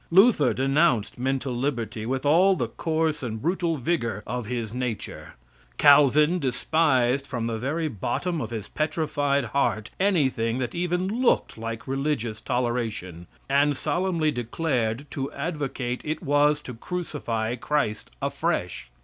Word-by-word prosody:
Luther 195 Hz, -2 st, +5 dB
denounced 135 Hz, -4 st, +2 dB
mental 130 Hz, 0 st, -1 dB
liberty 120 Hz, -4 st, -2 dB
with 130 Hz, +2 st, -2 dB
all 180 Hz, +6 st, +5 dB
the -, -, -2 dB
coarse 160 Hz, -2 st, -1 dB
and 110 Hz, -4 st, -4 dB
brutal 170 Hz, -, 0 dB
vigor 120 Hz, -, -1 dB
of 125 Hz, -3 st, -4 dB
his 115 Hz, -2 st, -3 dB
nature; 125 Hz, -3 st, -5 dB, 0.4 s
Calvin 150 Hz, +4 st, +6 dB
despised 135 Hz, -1 st, +1 dB
from 120 Hz, -4 st, -3 dB
the 115 Hz, -1 st, -2 dB
very 155 Hz, +6 st, -1 dB
bottom 155 Hz, -, -2 dB
of 110 Hz, -, -4 dB
his 110 Hz, -3 st, -5 dB
petrified 145 Hz, -3 st, 0 dB
heart 110 Hz, -6 st, 0 dB
anything 135 Hz, -, +2 dB
that 130 Hz, -2 st, -3 dB
even 180 Hz, +1 st, 0 dB
looked 255 Hz, -, +2 dB
like 115 Hz, +1 st, -6 dB
religious 135 Hz, -5 st, -2 dB
toleration, 115 Hz, -8 st, -2 dB, 0.2 s
and 140 Hz, +1 st, +3 dB
solemnly 165 Hz, 0 st, 0 dB
declared 120 Hz, -1 st, -1 dB
to 135 Hz, 0 st, -3 dB
advocate 140 Hz, -5 st, -3 dB
it 155 Hz, +3 st, -3 dB
was 145 Hz, 0 st, +3 dB
to 125 Hz, -, -8 dB
crucify 120 Hz, -6 st, -3 dB
Christ 125 Hz, -4 st, -1 dB
afresh. -, -, -2 dB
135 Hz, 130 wpm, -25 LUFS, 120-155 Hz, 0.4 s, Calvin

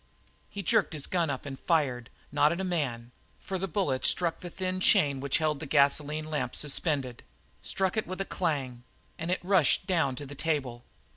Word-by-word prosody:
He 200 Hz, -, -6 dB
jerked 220 Hz, -3 st, +2 dB
his 150 Hz, -3 st, -3 dB
gun 170 Hz, -4 st, 0 dB
up 135 Hz, 0 st, -4 dB
and 135 Hz, -2 st, -6 dB
fired, 130 Hz, -8 st, 0 dB, 0.2 s
not 145 Hz, +1 st, +4 dB
at 170 Hz, -, -2 dB
a -, -, -1 dB
man, 130 Hz, -10 st, -2 dB, 0.3 s
for 190 Hz, -1 st, -4 dB
the 195 Hz, -, -2 dB
bullet 150 Hz, -8 st, -1 dB
struck 170 Hz, -2 st, +1 dB
the 175 Hz, -, -7 dB
thin 185 Hz, +1 st, -3 dB
chain 140 Hz, -6 st, +4 dB
which 140 Hz, 0 st, +1 dB
held 155 Hz, -2 st, 0 dB
the 155 Hz, -, -6 dB
gasoline 150 Hz, +2 st, +2 dB
lamp 155 Hz, -1 st, -2 dB
suspended, 140 Hz, -4 st, 0 dB, 0.4 s
struck 190 Hz, 0 st, 0 dB
it 220 Hz, -, -1 dB
with 185 Hz, +1 st, -5 dB
a 195 Hz, -, -1 dB
clang, 135 Hz, -11 st, -2 dB, 0.4 s
and 165 Hz, +1 st, -3 dB
it 185 Hz, -, +1 dB
rushed 185 Hz, -6 st, +3 dB
down 165 Hz, -9 st, +1 dB
to 145 Hz, -, -6 dB
the 140 Hz, -, -9 dB
table. 135 Hz, -6 st, -2 dB
155 Hz, 195 wpm, -29 LUFS, 140-180 Hz, 0.4 s, not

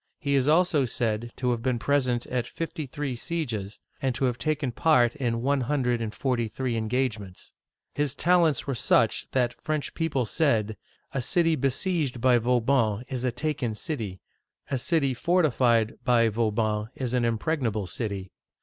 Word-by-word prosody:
He 140 Hz, -3 st, -1 dB
is 135 Hz, -1 st, +2 dB
also 155 Hz, -3 st, +3 dB
said 115 Hz, -1 st, -2 dB
to 125 Hz, -2 st, 0 dB
have 120 Hz, -1 st, -1 dB
been 125 Hz, 0 st, 0 dB
present 125 Hz, -2 st, +1 dB
at 125 Hz, -1 st, -2 dB
fifty 165 Hz, -3 st, -5 dB
three 140 Hz, 0 st, -4 dB
sieges, 120 Hz, -, -4 dB, 0.2 s
and 130 Hz, -2 st, 0 dB
to 135 Hz, -, 0 dB
have 120 Hz, -2 st, -1 dB
taken 155 Hz, -3 st, -1 dB
part 125 Hz, -3 st, +3 dB
in 120 Hz, -5 st, -1 dB
one 140 Hz, 0 st, +2 dB
hundred 125 Hz, -2 st, 0 dB
and 110 Hz, -2 st, -2 dB
forty 120 Hz, +1 st, -1 dB
three 125 Hz, +2 st, -3 dB
en 110 Hz, -1 st, -2 dB
gagements. 110 Hz, -7 st, -3 dB, 0.4 s
His 145 Hz, -2 st, -1 dB
talents 170 Hz, -4 st, +3 dB
were 140 Hz, -, -1 dB
such 115 Hz, -2 st, +2 dB
that 125 Hz, -2 st, 0 dB
French 155 Hz, -2 st, -2 dB
people 145 Hz, -7 st, 0 dB
said, 110 Hz, -5 st, +1 dB, 0.4 s
"A 135 Hz, -, -2 dB
city 165 Hz, +5 st, +2 dB
besieged, 140 Hz, 0 st, -1 dB
by 125 Hz, 0 st, +4 dB
Vauban 120 Hz, -2 st, +2 dB
is 130 Hz, -2 st, -3 dB
a 125 Hz, -, +1 dB
taken 125 Hz, -3 st, -2 dB
city; 105 Hz, -, -4 dB, 0.5 s
a 135 Hz, -, +1 dB
city 140 Hz, -1 st, +1 dB
fortified 125 Hz, -7 st, +2 dB
by. 115 Hz, -2 st, +4 dB
Vauban 110 Hz, -1 st, 0 dB
is 125 Hz, -2 st, -3 dB
an 125 Hz, -1 st, +2 dB
impregnable 115 Hz, -2 st, 0 dB
city!' 95 Hz, 0 st, -4 dB
125 Hz, 165 wpm, -26 LUFS, 115-145 Hz, 0.5 s, by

